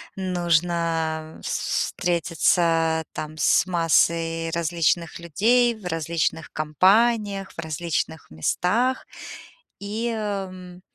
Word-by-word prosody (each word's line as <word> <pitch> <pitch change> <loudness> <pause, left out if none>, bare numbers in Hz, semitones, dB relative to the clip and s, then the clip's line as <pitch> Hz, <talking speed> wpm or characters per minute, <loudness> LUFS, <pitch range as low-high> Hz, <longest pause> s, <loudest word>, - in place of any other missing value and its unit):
нужно 170 -3 -1
вс - - -1
встретиться, 165 -1 +1
там, 155 0 -6
с 180 +4 +3
массой 165 -1 +1
различных 170 0 0
людей 230 +9 +2
в 210 - -15
различных 165 -1 -2
компаниях, 195 +6 +2
в - - -13
различных 160 -1 -3
местах. 220 - 0 0.8
И, 215 +4 -3
м, 190 -4 -5
170 Hz, 90 wpm, -24 LUFS, 165-195 Hz, 0.8 s, с